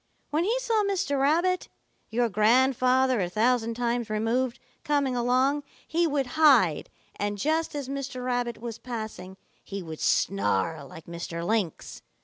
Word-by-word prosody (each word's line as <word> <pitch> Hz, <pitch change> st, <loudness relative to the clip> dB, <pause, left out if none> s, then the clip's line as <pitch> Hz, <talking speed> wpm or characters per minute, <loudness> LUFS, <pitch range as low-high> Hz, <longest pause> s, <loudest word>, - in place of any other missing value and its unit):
When 315 Hz, +4 st, +1 dB
he 470 Hz, +5 st, +1 dB
saw 455 Hz, -4 st, +1 dB
Mr. 355 Hz, -9 st, 0 dB
Rabbit, 345 Hz, +6 st, +2 dB, 0.4 s
your 240 Hz, +2 st, +1 dB
grandfather 255 Hz, +3 st, +3 dB
a 175 Hz, -, -1 dB
thousand 230 Hz, +3 st, +1 dB
times 240 Hz, -1 st, -1 dB
removed, 230 Hz, +4 st, 0 dB, 0.3 s
coming 285 Hz, -3 st, +1 dB
along, 255 Hz, +4 st, +2 dB, 0.3 s
he 335 Hz, +1 st, +1 dB
would 285 Hz, -3 st, 0 dB, 0.2 s
hide, 235 Hz, -, +5 dB, 0.3 s
and 205 Hz, 0 st, -2 dB
just 315 Hz, +7 st, 0 dB
as 285 Hz, -3 st, -4 dB
Mr. 270 Hz, -2 st, -5 dB
Rabbit 245 Hz, -2 st, -1 dB
was 230 Hz, -1 st, -6 dB
passing, 215 Hz, -6 st, -7 dB, 0.3 s
he 195 Hz, -1 st, -6 dB
would 160 Hz, -2 st, -8 dB
snarl 145 Hz, -, 0 dB
like 160 Hz, +4 st, -12 dB
Mr. 170 Hz, 0 st, -5 dB
Lynx. 210 Hz, -5 st, -2 dB
245 Hz, 140 wpm, -27 LUFS, 210-280 Hz, 0.4 s, hide